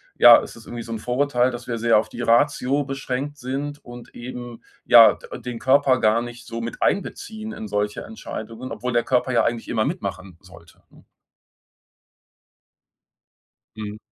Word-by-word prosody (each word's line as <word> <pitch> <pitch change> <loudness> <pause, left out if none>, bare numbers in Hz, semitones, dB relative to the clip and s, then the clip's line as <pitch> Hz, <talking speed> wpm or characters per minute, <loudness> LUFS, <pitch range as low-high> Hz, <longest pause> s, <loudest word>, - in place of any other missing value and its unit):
ja, - - +9
ist - - -5
das 115 - -14
irgendwie 120 -1 -6
so 115 - -9
'n 115 - -3
Vorurteil, 125 +1 +1
dass 120 -1 -7
wir 115 - -2
sehr 115 -1 +4
auf 105 - 0
die - - -7
Ratio 135 +3 +2
beschränkt 135 +1 -4
sind 140 +3 -5
und 120 0 -12
eben, 120 -1 -8 0.2
ja, - - +8
de - - -10
den 125 -2 -6
Körper 135 0 +3
gar 110 +2 +3
nicht 120 0 -9
so 115 0 -6
mit 115 - -6
einbeziehen 220 +2 -2
in 110 - -7
solche 105 +1 -2
Entscheidungen, 120 - -8
obwohl 125 +2 -4
der 120 - +2
Körper 130 0 +1
ja 115 - +3
eigentlich 115 -1 -2
immer 110 -2 0
mitmachen 100 - -5
sollte, 85 -2 -18
ne? - - -20 2.7
Mhm. 105 -1 -6
120 Hz, 165 wpm, -23 LUFS, 115-135 Hz, 2.7 s, ja